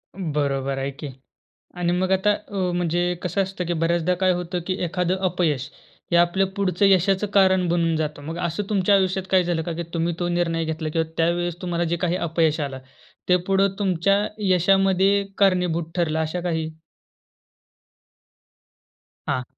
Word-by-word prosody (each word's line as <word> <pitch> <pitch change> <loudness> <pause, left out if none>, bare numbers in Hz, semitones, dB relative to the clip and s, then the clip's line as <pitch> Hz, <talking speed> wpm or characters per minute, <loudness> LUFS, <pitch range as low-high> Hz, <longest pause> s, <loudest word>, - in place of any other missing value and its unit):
बरोबर 140 -6 -1
आहे 135 +1 -2
की. 145 +2 -8 0.7
आणि 175 -1 0
मग 185 +1 0
आता 190 +2 +3
अ, 205 0 -8 0.2
म्हणजे 175 0 0
कसं 180 +2 0
असतं 190 -1 -4
की 175 - -1
बऱ्याचदा 170 +1 +1
काय 185 - +4
होतं 175 0 -3
की 185 - 0
एखादं 180 +1 0
अपयश 155 -7 -1 0.4
हे - - +5
आपल्या 175 +3 +3
पुढचं 195 -1 +1
यशाचं 195 +1 +3
कारण 190 -2 +4
बनून 165 -1 +1
जातं. 150 -2 -3
मग 160 +3 -6
असं 170 +5 -3
तुमच्या 200 -1 +2
आयुष्यात 190 -1 +1
काय 185 -1 +5
झालं 170 -2 -1
का? 170 - -4
की 170 - -4
तुम्ही 170 +1 0
तो 175 - -1
निर्णय 170 -1 0
घेतला 160 0 -3
किंवा 160 0 0
त्यावेळेस 170 +1 0
तुम्हाला 175 -1 -1
जे 170 - +2
काही 175 0 +1
अपयश 165 -2 0
आलं 140 -2 -3 0.5
ते 180 - +5
पुढं 195 0 +2
तुमच्या 195 +1 +1 0.2
यशामध्ये 195 +2 +3
कारणीभूत 180 -4 +2
ठरलं 160 -2 0
अशा 160 +3 -2
काही? 160 -2 -2 2.6
हां. 125 - 0
175 Hz, 160 wpm, -23 LUFS, 165-190 Hz, 2.6 s, हे